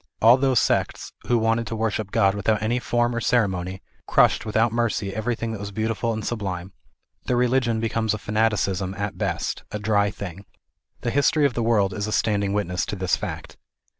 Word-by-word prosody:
All 115 +2 +7
those 130 -2 +3
sects - - -1
who 120 - +3
wanted 115 0 +1
to 115 - -3
wor 110 0 0
ship 105 -1 -3
God 100 -2 +3
without 105 +1 +1
any 120 +3 +1
form 120 0 0
or 120 - -1
ceremony, 95 -6 0 0.2
crushed - - +3
without 110 +2 +2
mercy 110 -4 -1
everything 115 +1 -2
that 110 - -5
was 100 0 -5
beautiful 110 +2 -1
and 110 -2 -4
sublime. 95 -5 -4 0.5
Their 125 - +1
religion 120 -2 +2
becomes 110 -1 0
a - - -4
fanaticism 100 -3 0
at 100 0 -4
best, - - -2
a 105 - -4
dry 105 -1 +2
thing. 100 0 -8 0.6
The 120 - -1
history 145 +2 +3
of 140 - +2
the 120 - -2
world 105 -4 +2
is 105 +2 -3
a - - -3
standing 100 -2 +1
witness 90 -3 -1
to 110 - -3
this 95 -2 +1
fact. - - -7
110 Hz, 195 wpm, -24 LUFS, 100-115 Hz, 0.6 s, All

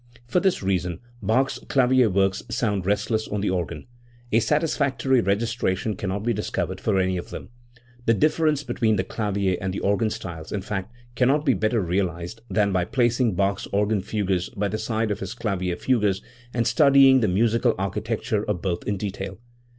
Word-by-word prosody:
For 120 +9 +1
this 190 - +1
reason 90 -2 -1 0.2
Bach's 120 +7 +1
clavier 130 -3 +4
works 95 0 +1
sound 105 -6 -1
rest 105 +3 0
less 110 0 0
on 105 -1 -2
the 100 - 0
organ. 90 -3 -3 0.5
A 115 - +5
satisfactory 140 -2 +1
registration 105 -1 0
cannot 100 +1 -3
be 120 +1 +1
discovered 105 0 -3
for 105 -3 +1
any 95 -1 +1
of 90 - -6
them. - - -8 0.6
The 115 - +5
difference 155 +1 +2
between 120 -3 +1
the 95 - 0
clavier 100 -4 -1
and 95 0 -2
the 95 - -3
organ 100 +3 +1
styles, 85 -6 -7
in 100 - -2
fact, 100 0 -4 0.2
cannot 135 +5 +2
be 135 - +4
better 110 +2 +1
realised 90 +3 -2
than 105 -2 +2
by 90 -2 +1
placing 120 -1 +1
Bach's 100 +1 0
organ 105 0 +1
fugues 95 -3 -1
by 105 -4 -2
the 110 +2 -3
side 110 -1 -1
of 100 - -2
his 115 - -5
clavier 95 -6 -2
fugues, 105 -3 +1 0.3
and 120 -1 0
studying 135 +2 +6
the 110 - +2
musical 115 +5 +2
architecture 105 +2 -2
of 105 -5 -3
both 90 -3 -1
in 105 - 0
detail. 95 -1 -5
105 Hz, 180 wpm, -24 LUFS, 95-120 Hz, 0.6 s, studying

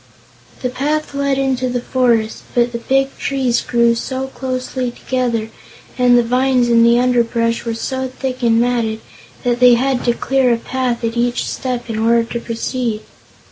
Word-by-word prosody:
The 250 - 0
path 295 +4 -2
led 280 -1 0
into 260 -2 0
the 245 0 -1
forest, 235 -3 0
but 240 0 +2
the 235 - -4
big 270 +3 0
trees 260 -3 0
grew 235 -1 +2
so 260 +3 -3
closely 255 -1 -3
together 240 -3 -2 0.4
and 245 -1 +4
the 240 - +4
vines 250 +1 +2
and 230 -1 +5
underbrush 235 -2 +1
were 230 -1 -2
so 260 +3 -3
thick 260 0 -5
and 230 -1 +3
matted 230 -2 0 0.4
that 245 -1 0
they 250 -1 +7
had 260 +1 0
to 240 - +3
clear 260 +1 +1
a 235 - +2
path 250 0 -2
at 230 0 -1
each 240 +1 0
step 250 -2 -4
in 220 -2 -3
order 230 +1 +3
to 235 +1 -5
proceed. 230 -1 -3
245 Hz, 170 wpm, -17 LUFS, 235-260 Hz, 0.4 s, they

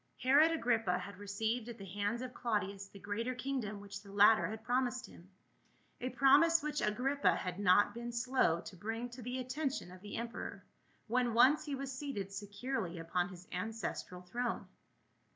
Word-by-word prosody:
HEROD 285 +5 +6
AGRIPPA 225 - +1
had 195 +1 -8
received 220 +4 -2
at 235 - -7
the 195 - -8
hands 205 +5 -2
of 255 -1 -6
Claudius 200 -5 -2
the 200 - -14
greater 225 +6 -3
kingdom 250 -6 -3
which 200 0 -8
the 200 -2 -13
latter 205 +2 +6
had 220 +1 -6
promised 250 +1 0
him, 175 +2 -15 0.7
a 250 - -2
promise 330 +6 +5
which 300 0 -1
Agrippa 245 -3 +2
had 180 +1 -4
not 205 +1 +5
been 235 +1 -5
slow 235 -8 +2
to - - -10
bring 225 +6 -4
to 245 +1 -10
the 250 +2 -3
attention 260 - -3
of 185 0 -12
the 205 0 -6
emperor, 235 +1 -5 0.4
when 240 0 +1
once 280 +6 +6
he 290 -2 -2
was 270 0 -5
seated 260 -9 -4
securely 205 -1 -4
upon 175 +2 -1
his 180 -1 -12
ancestral 185 -2 -4
throne. 240 +6 -2
225 Hz, 170 wpm, -35 LUFS, 200-255 Hz, 0.7 s, HEROD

